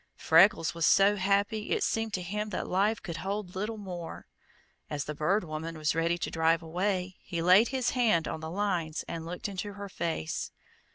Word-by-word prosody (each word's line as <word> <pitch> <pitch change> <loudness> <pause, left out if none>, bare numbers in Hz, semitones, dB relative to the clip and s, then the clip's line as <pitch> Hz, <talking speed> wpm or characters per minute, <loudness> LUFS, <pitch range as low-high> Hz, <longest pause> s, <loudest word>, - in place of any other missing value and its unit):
Freckles 165 +2 +4
was 165 -1 +1
so 200 +1 +5
happy 200 +2 0
it - - +1
seemed 225 0 0
to 180 - -3
him 210 +4 -3
that 195 - -3
life 205 +4 +1
could 170 -2 -5
hold 195 -1 -4
little 215 +4 -3
more. 180 -5 -7 0.6
As 145 -1 -2
the 150 - -4
Bird 180 +8 +1
Woman 160 0 -5
was 155 -1 +1
ready 165 +2 +1
to - - -3
drive 165 0 +2
away 185 +2 -2
he 170 -3 -5
laid 185 +7 +6
his 260 -2 0
hand 220 -10 +2
on - - -4
the 160 0 -6
lines 175 -4 -1
and 165 -1 -5
looked 175 +4 -4
into 200 +1 -5
her 200 0 -7
face. 165 - -3
185 Hz, 190 wpm, -29 LUFS, 165-205 Hz, 0.6 s, laid